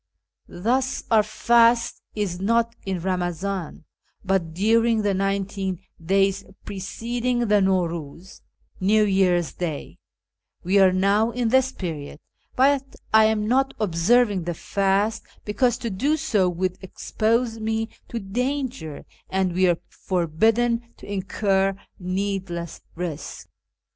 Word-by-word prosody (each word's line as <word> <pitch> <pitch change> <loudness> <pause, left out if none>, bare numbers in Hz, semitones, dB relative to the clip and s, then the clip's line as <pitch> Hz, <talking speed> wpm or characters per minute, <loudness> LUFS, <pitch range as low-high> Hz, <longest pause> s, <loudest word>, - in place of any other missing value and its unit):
Thus 255 +8 -1
our 220 -1 +6
fast 235 +2 +3
is 195 -4 -2
not 230 +3 +1
in 190 -2 -1
Eamazan, 180 -1 -3 0.4
but 185 -4 0
during 225 +5 +2
the 205 -1 +1
nineteen 195 -1 -1 0.3
days 195 +2 +2 0.2
preceding 240 +5 -2
the 210 -1 +4
Naxor^iiz 175 -2 -2 0.4
(New 215 +3 +3
Year's 185 -4 +2
Day 160 -5 -5 0.3
); - - -47
we 190 +3 +3
are 190 -1 +6
now 200 +4 +2
in 240 -1 -1
this 260 +1 +3
period, 155 - -6 0.4
but 275 +1 +2 0.2
I 220 0 +7
am 215 -1 +1
not 270 +3 +2
observing 205 +1 +2
the 175 -1 -3
fast, 200 +5 0 0.2
because 240 +3 +1
to 235 -3 -4
do 280 +11 +1
so 195 -10 +1
would 185 +1 -2
expose 225 +4 -1
me 220 0 -1 0.2
to 235 - -4
danger, 250 - -3 0.2
and 190 -2 0
we 185 +1 +3
are 170 - +2
forbidden 220 +7 +1 0.2
to - - -13
incur 195 0 0 0.2
needless 185 -2 -3
risk. 165 -3 -6
200 Hz, 125 wpm, -24 LUFS, 185-230 Hz, 0.4 s, I